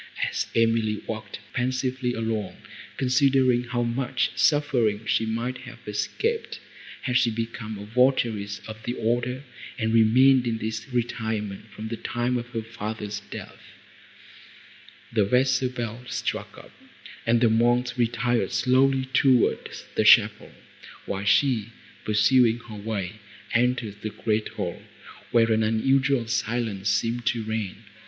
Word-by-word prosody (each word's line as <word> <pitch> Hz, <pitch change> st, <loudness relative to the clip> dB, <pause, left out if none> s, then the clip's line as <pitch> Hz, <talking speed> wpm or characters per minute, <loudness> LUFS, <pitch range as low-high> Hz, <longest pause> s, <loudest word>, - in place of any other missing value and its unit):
As -, -, -2 dB
Emily 115 Hz, -2 st, +2 dB
walked 110 Hz, -2 st, -6 dB, 0.2 s
pensively 130 Hz, 0 st, -1 dB
along, 110 Hz, -4 st, -3 dB, 0.4 s
considering 130 Hz, -2 st, +3 dB
how 120 Hz, 0 st, -1 dB
much 125 Hz, +1 st, -1 dB
suffering 125 Hz, -8 st, +2 dB
she 110 Hz, -, +1 dB
might 120 Hz, +3 st, -2 dB
have 125 Hz, -2 st, -11 dB
escaped, 105 Hz, -, -2 dB, 0.4 s
had 125 Hz, -, -1 dB
she 125 Hz, -2 st, +3 dB
become 115 Hz, -1 st, -4 dB
a 100 Hz, -, -8 dB
votaress 110 Hz, -4 st, +1 dB
of 110 Hz, 0 st, -8 dB
the 120 Hz, +2 st, -3 dB
order, 120 Hz, +3 st, -1 dB, 0.3 s
and 110 Hz, -2 st, 0 dB
remained 125 Hz, +3 st, +5 dB
in 115 Hz, -1 st, 0 dB
this 110 Hz, +1 st, -4 dB
retirement 110 Hz, -4 st, -3 dB
from 110 Hz, +1 st, -7 dB
the 115 Hz, -, -4 dB
time 120 Hz, +2 st, -1 dB
of 120 Hz, 0 st, -5 dB
her 115 Hz, -2 st, -4 dB
father's 105 Hz, -2 st, -5 dB
death, -, -, -9 dB, 1.5 s
the 110 Hz, -3 st, +3 dB
vesper 130 Hz, +4 st, +2 dB
bell 120 Hz, -1 st, -5 dB
struck -, -, -4 dB
up, -, -, -13 dB, 0.6 s
and 115 Hz, 0 st, +4 dB
the 120 Hz, -, +4 dB
monks 120 Hz, +2 st, +2 dB
retired 120 Hz, -3 st, 0 dB
slowly 130 Hz, +1 st, +3 dB
toward 130 Hz, -2 st, +2 dB, 0.2 s
the -, -, +1 dB
chapel, -, -, +5 dB, 0.5 s
while 100 Hz, 0 st, -4 dB
she, 115 Hz, 0 st, +3 dB, 0.4 s
pursuing 115 Hz, +2 st, +4 dB
her 115 Hz, -2 st, -11 dB
way, 105 Hz, -1 st, -4 dB, 0.4 s
entered 120 Hz, -4 st, 0 dB
the 110 Hz, -, -3 dB
great 105 Hz, +1 st, -1 dB
hall, 90 Hz, -5 st, -5 dB, 0.5 s
where 115 Hz, -1 st, +3 dB
an 110 Hz, 0 st, +3 dB
unusual 130 Hz, +4 st, +2 dB
silence 115 Hz, -4 st, -1 dB
seemed 115 Hz, +4 st, 0 dB
to 115 Hz, -2 st, +1 dB
reign. 110 Hz, -1 st, -4 dB
115 Hz, 130 wpm, -25 LUFS, 110-125 Hz, 1.5 s, remained